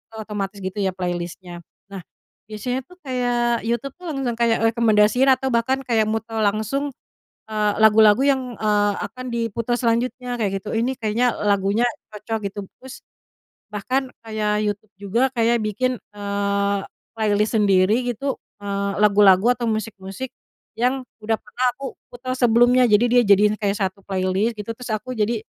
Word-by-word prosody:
otomatis 205 -2 -5
gitu 190 +1 -5
ya 190 - +1
playlist-nya. 175 -1 -5 0.3
Nah 195 -2 -6 0.5
biasanya 245 +5 -3
tuh 360 - -17
kayak 245 -2 0
YouTube 240 +3 -2
tuh 360 - -12
langsung 255 -4 -2
kayak 235 -1 +2
rekomendasiin, 225 +2 +3
atau 265 +1 +1
bahkan 235 +3 +1
kayak 225 -3 +2
muter 225 0 -3
langsung, 220 +8 0 0.6
eee, 210 -1 +1
lagu-lagu 220 +2 +6
yang, 265 -3 +1
eee, 205 -1 +2
akan 255 +4 -9
diputar 230 +1 -1
selanjutnya 245 +1 -1
kayak 195 -3 -1
gitu. - - -6
Ini 245 +4 0
kayaknya 230 +3 +1
lagunya 200 +3 +2 0.3
cocok 220 +2 -3
gitu. 205 - -10 0.2
Terus 265 0 -10 0.7
bahkan 255 +6 -1 0.2
kayak 215 -1 0
YouTube 205 0 -4
juga 205 +5 -1
kayak 235 -1 +2
bikin, 250 +5 0 0.2
eee, 200 0 0 0.4
playlist 215 0 +1
sendiri 205 +4 +3
gitu, 270 +4 -2 0.3
eee, 200 0 -2
lagu-lagu 205 +2 +5
atau 240 -1 -4
musik-musik 215 +2 -5 0.5
yang 255 +3 +1 0.2
udah 220 +1 +1
pernah 250 +1 -2
aku 275 -1 -6 0.2
putar 255 +1 -5
sebelumnya. 245 +1 +5
Jadi 210 +3 +5
dia 245 -1 +6
jadiin 205 +1 +5
kayak 200 -1 0
satu 195 -1 -2
playlist 190 +4 0
gitu, 210 +2 -6
terus 250 0 -9
aku 235 +4 -3
jadi 220 +1 0
220 Hz, 150 wpm, -22 LUFS, 205-245 Hz, 0.7 s, lagu-lagu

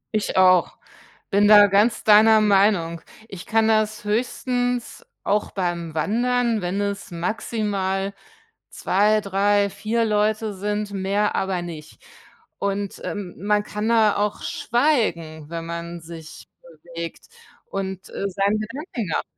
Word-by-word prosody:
Ich 210 -2 -1
auch, 185 -1 +4 0.5
bin 205 +1 +3
da 205 -1 +9
ganz 205 +4 +2
deiner 220 +1 +6
Meinung. 195 -5 +2 0.3
Ich 190 -2 -9
kann 220 0 +2
das 215 -1 +1
höchstens 245 +2 -2 0.2
auch 210 +1 0
beim 175 -4 -3
Wandern, 235 +5 0
wenn 185 +3 -2
es 200 -1 -3
maximal 195 0 -2 0.6
2, 210 +3 +2
3, 200 0 +1
4 220 +4 -1
Leute 215 0 0
sind, 205 +1 -3
mehr 200 +2 0
aber 190 -2 -1
nicht 160 - -10 0.6
und, 200 0 -3
äh, - - -4
man 205 +1 -2
kann 210 +1 -3
da 220 -3 +4
auch 205 0 -1
schweigen, 175 - -1
wenn 165 -1 -5
man 170 0 -6
sich 160 -1 -11
bewegt 170 0 -9 0.4
und, 190 - -5
äh, - - -5
seine 200 +2 0
Gedanken 235 - -5
nach - - 0
205 Hz, 125 wpm, -22 LUFS, 185-215 Hz, 0.6 s, da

